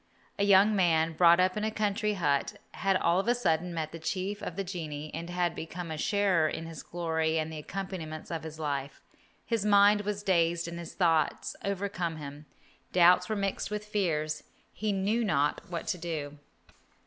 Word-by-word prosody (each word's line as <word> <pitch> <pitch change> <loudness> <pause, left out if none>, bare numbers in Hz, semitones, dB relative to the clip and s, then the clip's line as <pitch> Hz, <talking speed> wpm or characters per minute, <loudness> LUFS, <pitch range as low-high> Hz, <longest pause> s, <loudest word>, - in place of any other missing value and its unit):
A - - +3
young 200 +1 +6
man, 165 -3 +3
brought 170 +1 +6
up 185 0 +3
in 210 - -2
a 215 - +1
country 210 0 0
hut, 145 -6 0 0.2
had 195 0 +1
all 170 0 +2
of 195 - -2
a 240 - +4
sudden 180 -7 0
met 160 -2 -3
the 165 - -8
chief 190 +5 -3
of 165 - -5
the 195 - -2
genii, 155 -5 -5
and 170 +2 -5
had 175 -1 0
become 170 +1 -6
a - - -2
sharer 190 -5 +2
in 165 - -5
his 165 -1 -8
glory 160 -2 -1
and 160 0 -2
the 155 - -5
accompaniments 170 -3 -6
of 165 -2 -3
his 160 -1 -8
life. 140 -3 -3 0.5
His 230 -4 0
mind 205 0 +5
was 205 0 -3
dazed 170 -3 +2
and 170 0 -6
his 170 - -8
thoughts 165 -4 +1
overcame 190 -4 -2
him. 145 0 -9 0.4
Doubts 180 +2 +5
were 215 - 0
mixed 200 -1 -2
with 210 0 -4
fears. 155 -7 -1 0.3
He 215 0 -1
knew 205 +4 +1
not 145 -8 +1
what 170 -2 -4
to 180 - -1
do. 150 -4 -5
175 Hz, 190 wpm, -29 LUFS, 160-200 Hz, 0.5 s, young